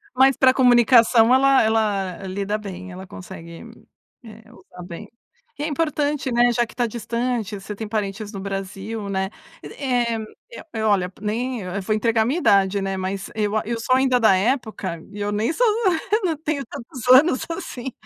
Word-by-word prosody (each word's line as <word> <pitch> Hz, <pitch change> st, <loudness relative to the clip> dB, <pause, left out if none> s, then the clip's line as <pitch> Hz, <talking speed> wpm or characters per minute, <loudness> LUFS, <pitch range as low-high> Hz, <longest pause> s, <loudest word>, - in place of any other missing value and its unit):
Mas 265 Hz, +1 st, +5 dB
pra 260 Hz, -1 st, +5 dB
comunicação, 240 Hz, -2 st, +5 dB
ela 270 Hz, 0 st, +5 dB
ela 205 Hz, -5 st, 0 dB
lida 200 Hz, +2 st, -2 dB
bem, 185 Hz, -3 st, -8 dB
ela 185 Hz, +1 st, -9 dB
consegue, 170 Hz, -1 st, -10 dB, 0.6 s
eh, 225 Hz, 0 st, -13 dB
usar 180 Hz, -6 st, -13 dB
bem. 180 Hz, +4 st, -9 dB, 0.5 s
E -, -, -2 dB
é -, -, -1 dB
importante, 295 Hz, -3 st, -1 dB
né, 240 Hz, 0 st, +4 dB
já 240 Hz, 0 st, +1 dB
que -, -, -15 dB
está 240 Hz, -1 st, 0 dB
distante, 230 Hz, -2 st, -3 dB
você 205 Hz, +2 st, -7 dB
tem 220 Hz, +1 st, -6 dB
parentes 210 Hz, -1 st, -3 dB
no 195 Hz, -, -5 dB
Brasil, 195 Hz, +2 st, -5 dB
né, 190 Hz, 0 st, -1 dB, 0.3 s
eh 245 Hz, -4 st, -1 dB, 0.4 s
eh -, -, -9 dB
eh, 220 Hz, -1 st, -3 dB
olha, 195 Hz, -4 st, +2 dB
nem 235 Hz, +3 st, -2 dB, 0.2 s
vou 215 Hz, +3 st, 0 dB
entregar 225 Hz, 0 st, +2 dB
a -, -, -2 dB
minha 275 Hz, +9 st, 0 dB
idade, 200 Hz, -, +3 dB
né, 195 Hz, 0 st, -2 dB
mas 190 Hz, +1 st, -4 dB
eu 210 Hz, -1 st, -1 dB
a -, -, +1 dB
eu 230 Hz, +1 st, -3 dB
sou 255 Hz, +3 st, +2 dB
ainda 260 Hz, -1 st, +3 dB
da 220 Hz, -5 st, +5 dB
época 215 Hz, -5 st, -1 dB
e 205 Hz, -, -9 dB
eu 205 Hz, -, -1 dB
nem 215 Hz, +8 st, 0 dB
sou -, -, +2 dB, 0.4 s
eu 435 Hz, +2 st, +3 dB
não 330 Hz, -3 st, 0 dB
tenho 305 Hz, -2 st, -3 dB
tantos 235 Hz, +1 st, -9 dB
anos 260 Hz, +2 st, +6 dB
assim, 265 Hz, -5 st, -6 dB
220 Hz, 185 wpm, -22 LUFS, 195-255 Hz, 0.6 s, anos